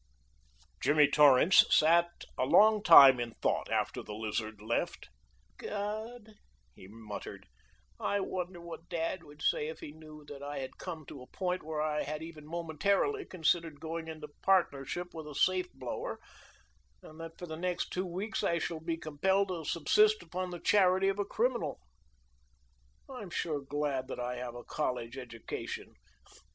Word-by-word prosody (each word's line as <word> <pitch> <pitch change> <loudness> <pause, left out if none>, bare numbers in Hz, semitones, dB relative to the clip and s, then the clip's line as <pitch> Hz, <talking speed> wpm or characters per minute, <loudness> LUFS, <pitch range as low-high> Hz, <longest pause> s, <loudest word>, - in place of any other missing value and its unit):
Jimmy 150 0 +5
Torrance 145 +4 +7
sat 170 +2 +5 0.3
a - - 0
long 210 +10 +5
time 140 -9 +9
in 120 -2 -4
thought - - -1
after - - -1
the 105 - -8
Lizard 110 0 -3
left. 110 - -2 0.5
"God!" 215 +2 -5 0.4
he 95 - -14
muttered. 105 -2 -8 0.5
"I 205 - 0
wonder 180 -2 -4
what 170 -1 -10
dad 170 +1 -2
would 150 -1 -13
say 150 - +1
if 160 - -7
he 145 - -8
knew 155 -1 -13
that 145 -1 -10
I 145 0 -5
had 130 -1 -6
come 165 -5 -6
to 135 - -10
a 125 - -12
point 185 -1 -2
where 155 -1 -3
I 150 -1 0
had 155 +1 -4
even 160 -2 -10
momentarily 170 - 0
considered 165 -3 0
going 165 +1 -5
into 155 -2 -7
partnership 175 -2 +1
with 160 -2 -7
a 150 - -9
safe 185 +3 +2
blower, 130 -2 -5 0.8
and 155 - -13
that 165 0 -8
for 180 - -7
the 160 -2 -6
next 180 +2 -2
two 185 +1 -2
weeks 195 +6 -3
I 170 - +2
shall 165 -1 -3
be 165 +1 -3
compelled 190 +6 +1
to 175 -3 -4
subsist 210 +7 +3
upon 180 +2 -4
the 175 -1 -6
charity 190 0 +4
of 195 +1 -2
a 205 - +1
criminal? 225 - -1 1.3
"I'm 250 -8 -8
sure 155 -4 -2
glad 140 -2 -2
that - - -6
I 125 0 -3
have 120 -1 -6
a 120 - -8
college 125 -5 -3
education. 115 -4 -7
160 Hz, 165 wpm, -31 LUFS, 140-185 Hz, 1.3 s, time